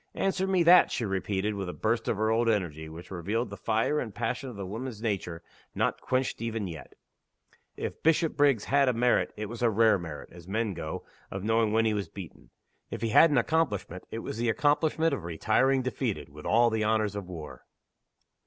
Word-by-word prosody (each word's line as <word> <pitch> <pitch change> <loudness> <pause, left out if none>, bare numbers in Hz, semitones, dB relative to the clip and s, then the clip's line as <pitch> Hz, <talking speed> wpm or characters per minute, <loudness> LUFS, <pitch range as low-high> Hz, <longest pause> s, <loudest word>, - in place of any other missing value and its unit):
"Answer 190 0 0
me 185 -2 +3
that!" 175 +2 +7
she 115 - -1
repeated, 95 +1 -1
with 100 -3 -4
a - - -5
burst 110 +1 -1
of 110 - 0
her 110 +1 +1
old 115 +1 +2
energy 80 -7 -1
which 85 +4 -11
revealed 100 +7 -2
the - - -5
fire 115 +7 0
and 110 -7 -5
passion 125 +3 -2
of 120 - -9
the 100 -1 -5
woman's 110 +3 -6
nature, 95 -7 -3 0.3
not - - 0
quenched 130 -2 -1
even 115 -2 -2
yet! 80 -4 -9 0.8
If - - -5
Bishopriggs 145 - +3
had 140 -1 +3
a - - +1
merit, 120 +1 +2
it 105 - -3
was 115 +3 -8
a 120 - +4
rare 110 -1 +4
merit, 80 -4 -8
as 85 -1 -13
men 110 +1 -1
go, 80 -2 -6 0.2
of 95 -1 -5
knowing 115 0 +2
when 115 +1 +3
he 110 - +2
was 100 -2 -3
beaten. 85 -10 -11 0.4
If - - -6
he 115 - +1
had 165 +9 +7
an 145 - +2
accomplishment, 120 - 0
it 115 - -5
was 110 - -5
the 120 0 +1
accomplishment 155 +5 +2
of 125 - -3
retiring 110 +10 +1
defeated, 115 - -3
with 75 +1 -9
all 115 +1 +4
the 110 -1 0
honors 110 -1 +1
of 100 -3 -5
war. 80 -4 -9
110 Hz, 205 wpm, -28 LUFS, 95-125 Hz, 0.8 s, that